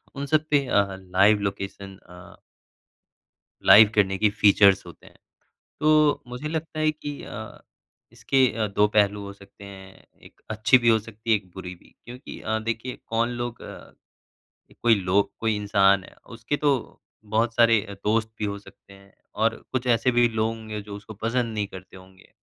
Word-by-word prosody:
उन 140 Hz, 0 st, -4 dB
सब 155 Hz, +1 st, +1 dB
पे 145 Hz, -2 st, +2 dB
अ, 100 Hz, -3 st, +3 dB
लाइव 95 Hz, +3 st, +3 dB
लोकेशन 100 Hz, 0 st, -9 dB
अ 90 Hz, -1 st, -15 dB, 1.3 s
लाइव 105 Hz, 0 st, +8 dB
करने 95 Hz, -2 st, +2 dB
की 105 Hz, +1 st, +3 dB
फ़ीचर्स 100 Hz, -1 st, +4 dB
होते -, -, -14 dB
हैं। -, -, -19 dB, 0.6 s
तो 155 Hz, -1 st, +3 dB
मुझे 125 Hz, +5 st, -6 dB
लगता 160 Hz, -1 st, -5 dB
है 155 Hz, 0 st, +2 dB
कि 145 Hz, -1 st, -8 dB
अ, 110 Hz, 0 st, -9 dB, 0.5 s
इसके 130 Hz, +3 st, +2 dB
अ, 110 Hz, -2 st, -2 dB
2 105 Hz, +1 st, +2 dB
पहलू 105 Hz, -1 st, +1 dB
हो 100 Hz, 0 st, -8 dB
सकते 100 Hz, 0 st, -17 dB
हैं। 95 Hz, -1 st, -13 dB, 0.2 s
1 -, -, -18 dB
अच्छी 110 Hz, +3 st, +4 dB
भी 120 Hz, -1 st, +2 dB
हो 110 Hz, -1 st, +4 dB
सकती 110 Hz, +1 st, -11 dB
है, -, -, +6 dB
1 95 Hz, -3 st, -6 dB
बुरी 90 Hz, -1 st, -8 dB
भी। -, -, -24 dB
क्योंकि 125 Hz, +2 st, -10 dB
अ, 110 Hz, 0 st, -2 dB
देखिए 115 Hz, +3 st, -4 dB
कौन 115 Hz, +1 st, 0 dB
लोग 120 Hz, -1 st, -5 dB
अ, -, -, -11 dB, 0.9 s
कोई 115 Hz, -2 st, +5 dB
लोग, 95 Hz, +1 st, 0 dB
कोई 110 Hz, -1 st, 0 dB
इंसान 100 Hz, -2 st, +2 dB
है, -, -, -16 dB
उसके 115 Hz, +5 st, -4 dB
तो 140 Hz, -5 st, -1 dB, 0.3 s
बहुत 110 Hz, +2 st, 0 dB
सारे 115 Hz, -2 st, +5 dB, 0.2 s
दोस्त 110 Hz, +1 st, 0 dB
भी 105 Hz, -, -1 dB
हो 100 Hz, 0 st, -4 dB
सकते 100 Hz, -, -18 dB
हैं। 100 Hz, 0 st, -19 dB, 0.3 s
और -, -, +2 dB, 0.2 s
कुछ 130 Hz, -1 st, -2 dB
ऐसे 120 Hz, +2 st, +2 dB
भी 120 Hz, 0 st, +4 dB
लोग 110 Hz, -1 st, -1 dB
होंगे, 110 Hz, -2 st, -7 dB
जो 100 Hz, 0 st, -9 dB
उसको 105 Hz, +2 st, -10 dB
पसंद 115 Hz, +2 st, -2 dB
नहीं 105 Hz, -1 st, -2 dB
करते 95 Hz, 0 st, -12 dB
होंगे। 95 Hz, 0 st, -19 dB
110 Hz, 180 wpm, -24 LUFS, 100-120 Hz, 1.3 s, लाइव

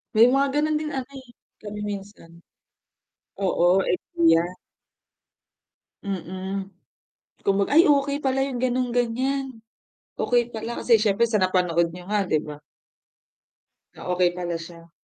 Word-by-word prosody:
May 225 Hz, -, +8 dB
mga 275 Hz, +1 st, +3 dB
ganun 305 Hz, +1 st, +1 dB
din 305 Hz, -1 st, -4 dB
ano, 265 Hz, -1 st, -4 dB
eh, 260 Hz, -2 st, -17 dB, 0.3 s
kami 210 Hz, 0 st, -7 dB
minsan. 200 Hz, -4 st, -7 dB, 1.1 s
Oo, 185 Hz, 0 st, +3 dB
idea. 165 Hz, -2 st, +2 dB, 1.6 s
Mm. 190 Hz, +1 st, -4 dB, 0.8 s
Kung 195 Hz, 0 st, +2 dB
mag -, -, -5 dB
ay 330 Hz, +4 st, +7 dB
okey 280 Hz, 0 st, +2 dB
pala 270 Hz, -1 st, +1 dB
'yung 260 Hz, -3 st, -4 dB
ganon, 250 Hz, -1 st, 0 dB
ganiyan. 250 Hz, +1 st, -1 dB, 0.5 s
Okey 240 Hz, -1 st, +1 dB
pala 225 Hz, +1 st, -5 dB
kasi 235 Hz, -2 st, +5 dB
siyempre 215 Hz, +2 st, +2 dB
sa 220 Hz, -, +2 dB
napanood 180 Hz, -2 st, +2 dB
niyo 180 Hz, 0 st, -10 dB
nga, 210 Hz, -1 st, +1 dB
'di 155 Hz, -4 st, +1 dB
ba? 150 Hz, -1 st, -9 dB, 1.4 s
Ah, -, -, -10 dB
okey 180 Hz, -1 st, +3 dB
pala 175 Hz, -1 st, -3 dB
siya. 165 Hz, 0 st, -12 dB
210 Hz, 130 wpm, -24 LUFS, 180-255 Hz, 1.6 s, May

